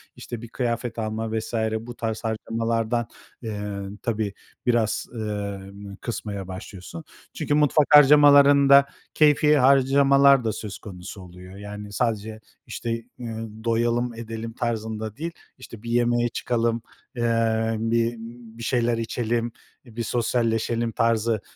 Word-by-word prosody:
işte, 120 -2 -7
bir 120 - -8
kıyafet 120 0 -3
alma, 110 0 -3
vs. 110 - -8 0.3
bu 120 +2 -9
tarz 110 -2 -4
harcamalardan, 115 +1 -1 0.3
eee, 105 -3 -5 0.2
tabii, 110 -3 -1 0.3
biraz, 120 -3 +1
emm, 100 -2 -5
kısmaya 100 -5 -5
başlıyorsun. 95 - -8 0.3
Çünkü 150 -2 -2
mutfak 150 0 +3
harcamalarında 140 -1 +7 0.3
keyfî 150 0 +4
harcamalar 140 0 +5
da 110 - 0
söz 100 -2 -6
konusu 95 0 -9
oluyor. 90 +1 -12
Yani 105 0 -8
sadece, 110 -1 -2 0.3
işte, 115 - -4 0.3
eee, 115 -2 -6 0.3
doyalım, 120 +1 +1
edelim 115 0 -6
tarzında 110 -2 -3
değil, 165 +4 -4 0.3
işte, 115 -4 -12
bir 115 - -6
yemeğe 120 0 +2
çıkalım, 115 0 -1 0.3
eee, 115 -1 +1
bir 115 +1 +1 0.4
bir 115 - -8
şeyler 120 -1 +1
içelim, 115 0 -2 0.3
bir 115 0 -6
sosyalleşelim 115 0 0
tarzı 115 -1 +1
115 Hz, 120 wpm, -24 LUFS, 110-120 Hz, 0.4 s, harcamalarında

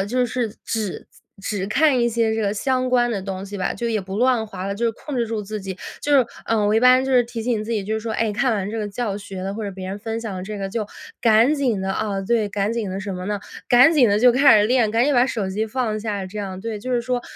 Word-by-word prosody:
呃， 195 - +1
就 250 +3 +1
是 230 -3 -2
只 215 -5 -3 0.3
只 195 -1 -3
看 275 +1 +3
一 235 - +3
些 225 -1 +1
这 225 - -1
个 200 0 0
相 255 +3 0
关 240 -1 +3
的 200 -4 -2
东 195 0 -5
西 205 +1 -7
吧， 185 - -1
就 235 - -3
也 220 -2 0
不 195 +1 -6
乱 245 -1 +2
滑 190 -2 -6
了， 200 - -2
就 235 +3 -2
是 230 - +3
控 285 +4 -7
制 235 - +1
住 220 -1 -3
自 210 +1 -5
己。 190 0 -6 0.2
就 290 - 0
是， 255 -3 +4 0.2
呃， 215 -2 +1
我 210 - +2
一 225 - +4
般 255 +1 +6
就 265 - -1
是 250 -1 +6
提 235 -1 -6
醒 225 -3 0
自 225 - -7
己， 210 -4 -1
就 215 - -2
是 220 - -2
说， 225 0 -4
哎， 220 -1 0
看 245 +3 +1
完 200 -2 -2
这 225 - -4
个 210 -2 -2
教 205 -1 -3
学 195 -2 -8
了， 195 +2 -4
或 220 - -5
者 200 - -3
别 185 -1 -7
人 195 +2 -4
分 225 +1 -4
享 220 -4 -5
了 185 - -5
这 210 +1 -6
个， 195 0 -3
就 215 +1 -2 0.4
赶 230 +5 +5
紧 250 -9 0
的， 190 0 -1
啊， 200 -1 -2
对， 215 +1 +1
赶 205 +2 -1
紧 220 -5 -2
的 190 - -4
什 195 0 -5
么 180 0 -5
呢？ 210 0 -1 0.3
赶 250 +7 +7
紧 260 -8 +5
地 205 +1 +3
就 245 +1 +6
开 265 -5 +6
始 210 - +3
练， 240 -3 +2
赶 230 +3 +2
紧 290 -1 +2
把 245 0 +5
手 215 -7 -2
机 210 +3 -1
放 220 -2 -2
下， 205 -3 -3
这 210 +3 -8
样， 190 -1 -5
对。 225 0 -4
就 255 +3 -5
是 240 - +2
说， 245 0 -2
220 Hz, 320 characters per minute, -22 LUFS, 200-240 Hz, 0.4 s, 赶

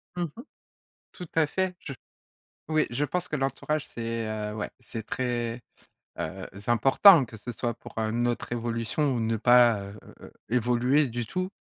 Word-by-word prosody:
Mmh 175 - -1
mh. 170 - -1 0.8
Tout 180 - -8
à 160 -2 +4
fait, 185 +3 -1
je 140 - -7 0.7
oui. 155 -1 +2
Je 135 +5 0
pense 180 +3 -2
que - - -3
l'entourage 145 +2 -2
c'est, 115 -1 -4
heu, 105 -1 -3
ouais. 105 - -3
C'est 110 -2 -7
très, 120 -1 -2 0.6
heu, 95 +4 -4 0.2
important 135 - +7
que 115 -1 -11
ce 105 +4 -7
soit 120 +1 -2
pour, - - -13
heu, 110 -1 0
notre 120 +1 -1
évolution 120 +4 -1
ou 120 - -1
ne 115 0 0
pas, 120 -2 +5 0.4
heu, - - -12 0.2
évoluer 125 +4 +2
du 120 0 -4
tout 185 +8 -2
120 Hz, 165 wpm, -27 LUFS, 115-145 Hz, 0.8 s, important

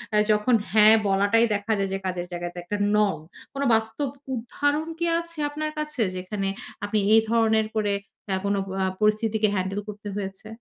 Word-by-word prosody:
এ - - +5
যখন 210 +4 +3 0.2
হ্যাঁ, 215 +1 +7
বলাটাই 200 +4 +3
দেখা 205 +2 -3
যায় 195 -1 -1
যে - - 0
কাজের 180 -1 -2
জায়গাতে 175 0 -5
একটা 205 +4 -3 0.2
নর্ম। 200 -7 +1 0.3
কোন 275 - -4
বাস্তব 225 +6 0 0.3
উদাহরণ 290 +6 -1
কি 340 - +1
আছে 335 -1 -7
আপনার 305 +1 -3
কাছে? 300 -4 -2
যেখানে 195 +2 -3 0.4
আপনি 210 +1 0
এই 225 - +7
ধরনের 220 -1 +3
করে, 210 -2 +1 0.4
এ - - +2
কোন 200 - +1 0.3
আ - - +2 0.2
পরিস্থিতিকে 215 0 +2
হ্যান্ডেল 190 +1 -1
করতে 210 0 -8
হয়েছে? 195 +1 -5
215 Hz, 170 wpm, -25 LUFS, 195-230 Hz, 0.4 s, হ্যাঁ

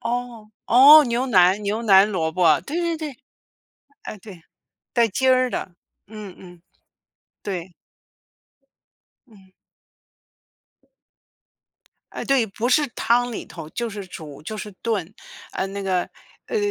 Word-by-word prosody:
哦 240 -3 -5 0.2
哦， 290 +5 +8
牛 240 +1 -1
腩 190 -3 +4
牛 210 +3 -2
腩 200 -2 +5
萝 160 -5 -1
卜， 165 -3 +3
对 315 - -4
对 340 -1 -1
对， 305 -5 -7 0.9
哎， - - -8
对， 190 -3 -13 0.5
带 235 -1 +3
筋 260 +6 +1
儿 255 0 +3
的， 185 - -5 0.3
嗯 210 -3 -10
嗯， 175 -2 -15 0.8
对。 185 -2 -5 1.6
嗯。 195 -4 -20 2.6
哎， - - -6
对， 270 -4 +2
不 220 +4 -3
是 290 +3 +3
汤 240 +2 +1
里 - - -6
头 165 -3 -10
就 235 +5 -4
是 200 -2 -8
煮， 155 -5 -11
就 215 +8 -6
是 210 0 -7
炖。 210 -5 -2 0.4
呃， 190 - -2
那 200 +1 -6
个， 185 -2 -1 0.4
呃， - - -3
215 Hz, 135 characters per minute, -22 LUFS, 185-245 Hz, 2.6 s, 哦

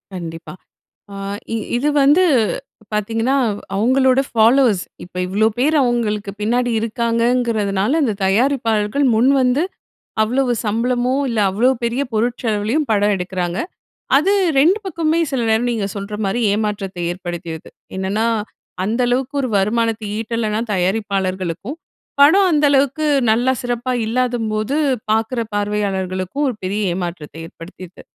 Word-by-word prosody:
கண்டிப்பா. 165 -2 -7 0.6
அ - - -8 0.4
இ - - 0 0.2
இது 285 +5 +1
வந்து 295 +7 +5 0.7
பார்த்தீங்கன்னா 225 +5 0 0.4
அவங்களோட 260 +5 +3
ஃபாலோவர்ஸ். 230 -3 +3 0.2
இப்ப 180 - -15
இவ்வளோ 205 +4 +2
பேர் 300 +5 +2
அவங்களுக்கு 215 -5 -1
பின்னாடி 245 +3 +1
இருக்காங்கங்கிறதுனால, 230 -2 0
இந்த 230 -6 +1
தயாரிப்பாளர்கள் 225 +2 +1
முன்வந்து 260 +4 +3 0.6
அவ்வளோவு 250 +3 +1
சம்பளமோ, 245 +4 0
இல்ல 230 -2 -2
அவ்வளோ 230 +7 +2
பெரிய 235 +4 0
பொருட்செலவுலயும் 230 +4 0
படம் 205 -1 +3
எடுக்கிறாங்க. 180 -1 -3 0.6
அது 380 +8 +2 0.3
2 340 +9 +4
பக்கமுமே 330 -2 0
சில 265 -3 0
நேரம் 225 +2 +2
நீங்க 220 -4 -1
சொல்ற 200 +1 -5
மாரி 225 +5 -1
ஏமாற்றத்தை 205 -4 -3
ஏற்படுத்தியிருது. 175 -3 -7 0.3
என்னன்னா 195 +4 -1 0.6
அந்த 225 +6 0
அளவுக்கு 255 +3 -1
ஒரு 260 - -1
வருமானத்த 225 +2 0
ஈட்டலைனா 220 -1 -2
தயாரிப்பாளர்களுக்கும், 190 - -2 0.4
படம் 375 +7 +6
அந்த 300 -2 +3
அளவுக்கு 280 +2 +2 0.3
நல்லா 240 +4 +2
சிறப்பா 245 0 -2
இல்லாதபோது 230 0 -1 0.4
பாக்குற 225 +3 0 0.2
பார்வையாளர்களுக்கும் 200 +3 -2
ஒரு 245 - -4
பெரிய 200 +3 -2
ஏமாற்றத்த 170 -5 -5
ஏற்படுத்திருது. 175 +2 -12
225 Hz, 115 wpm, -19 LUFS, 200-255 Hz, 0.7 s, படம்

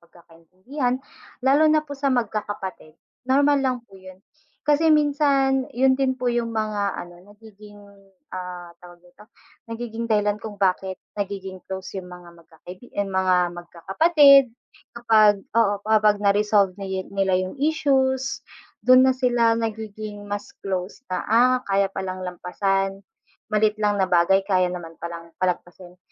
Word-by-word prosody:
pagkakaintindihan 185 - -5 0.5
lalo 290 +4 +4
na 310 0 +2
po 285 - -9
sa 280 0 -1
magkakapatid. 205 - -3 0.3
Normal 285 +1 +3
lang 260 -2 0
po 195 -3 -17
yun, 185 0 -13 0.4
kasi 300 +2 +3
minsan 280 -3 +2
'yun 265 +1 +4
din 260 -1 0
po 245 -1 -1
'yung 235 -1 -1
mga 210 -2 -1
ano, 175 0 -9 0.2
nagiging, 210 -1 -15 0.6
ah, 180 -1 -7
tawag 175 0 -16
nito, 210 +5 -19 0.4
nagiging 230 0 -5
dahilan 210 -1 +1
kung 210 -2 -8
bakit 190 -1 0 0.2
nagiging 190 -2 -5
close 190 0 -6
'yung 180 - -13
mga 180 -1 -12
magkakaibigan, 180 +7 -14
ay - - -7
mga, 185 -1 +2 0.2
magkakapatid 275 - +5 0.5
kapag 215 -4 +4
oo, 225 -3 +3
kapag 215 -1 +3
na-resolve 205 -1 +2
niye 190 -1 -4
nila 195 -2 +1
'yung 185 +8 -4
issues, 270 -3 +1 0.4
do'n 255 +1 +6
na 260 - +4
sila 240 -3 +2
nagiging 215 -2 -5
mas 205 0 -6
close 190 +6 -4
na, 180 - -1
ah, 245 +4 +4
kaya 195 0 +2
palang 185 -1 -5
lampasan, 195 +2 -2 0.5
maliit 215 0 +2
lang 205 -1 +1
na 190 - +4
bagay 180 +2 +3
kaya 185 -2 +2
naman 165 -2 -8
palang 170 0 -8
palagpasin. 180 0 -4
205 Hz, 140 wpm, -23 LUFS, 185-250 Hz, 0.6 s, do'n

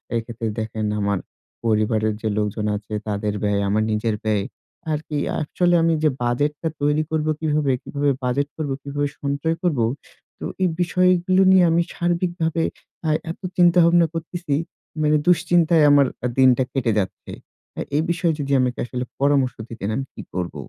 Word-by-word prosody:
এক্ষেত্রে 115 0 -3
দেখেন 110 0 -3
আমার 100 -1 0 0.4
পরিবারের 110 -1 +1
যে 110 - -1
লোকজন 105 0 -1
আছে 105 +1 -7
তাদের 105 0 -1
ব্যয়, 100 -1 +1
আমার 110 +2 +2
নিজের 110 0 0
ব্যয় 105 -2 +1 0.5
আর 150 - 0
কি 150 - -3
অ্যাকচুয়ালি 175 +3 +1
আমি 165 0 +3
যে 155 - +5
বাজেট 120 +5 +1
টা 160 - 0
তৈরি 150 +2 +2
করব, 155 -1 0
কিভাবে 150 -3 +1
কিভাবে 145 0 -1
বাজেট 130 +3 0
করবো, 145 -4 -2
কিভাবে 145 0 -2
সঞ্চয় 140 +3 -1
করব। 165 -8 +1 0.6
তো - - -5 0.2
এই 185 - +3
বিষয়গুলো 180 +1 +3
নিয়ে 190 -1 +6
আমি 170 +1 +3
সার্বিকভাবে 170 -2 0 0.4
এ্যা 155 - +1 0.2
এত - - -11 0.2
চিন্তা 175 0 +5
ভাবনা 170 0 +5
করতেছি 165 -2 -3 0.5
মানে 150 0 +3
দুশ্চিন্তায় 170 -2 +4
আমার 145 -1 +6 0.3
দিনটা 130 -1 +5
কেটে 125 -4 +1
যাচ্ছে। 95 - -5 0.4
এ্যা - - -3
এই 150 - +2
বিষয়ে 170 -1 +1
যদি 140 -1 -3
আমাকে 125 -1 0
আসলে 125 0 -4 0.2
পরামর্শ 135 -2 +2
দিতেন 110 -3 -5
আমি 135 0 -2
কি - - -8
করব? 90 -1 -3
145 Hz, 160 wpm, -22 LUFS, 115-165 Hz, 0.6 s, নিয়ে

